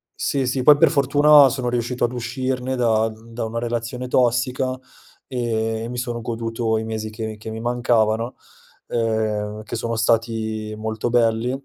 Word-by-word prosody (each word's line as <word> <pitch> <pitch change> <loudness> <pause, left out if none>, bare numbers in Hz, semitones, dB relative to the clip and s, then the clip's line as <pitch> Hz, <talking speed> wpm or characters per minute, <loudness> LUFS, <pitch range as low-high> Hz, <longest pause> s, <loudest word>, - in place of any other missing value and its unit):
Sì, 135 -2 -1
sì, 130 +1 0
poi 145 +2 +8
per - - +5
fortuna 145 0 +6
sono 130 -1 -2
riuscito 120 +1 -2
ad 120 - +2
uscirne 130 +1 -3
da 115 -3 +2
da 115 +1 -7
una 110 +1 -5
relazione 120 +1 -3
tossica 125 +1 +1 0.5
e 115 -2 -2
mi 125 - -5
sono 120 -1 -3
goduto 115 0 -2
i 110 - -2
mesi 110 -1 -4
che 110 +1 -6
mi 110 -1 -6
che 110 +1 -8
mi 110 0 -5
mancavano, 120 -1 +1 0.5
ehm, 110 -2 -1
che - - -6
sono 115 0 -2
stati 110 -1 0
molto 110 +1 -3
belli, 115 0 +2
115 Hz, 160 wpm, -22 LUFS, 110-125 Hz, 0.5 s, poi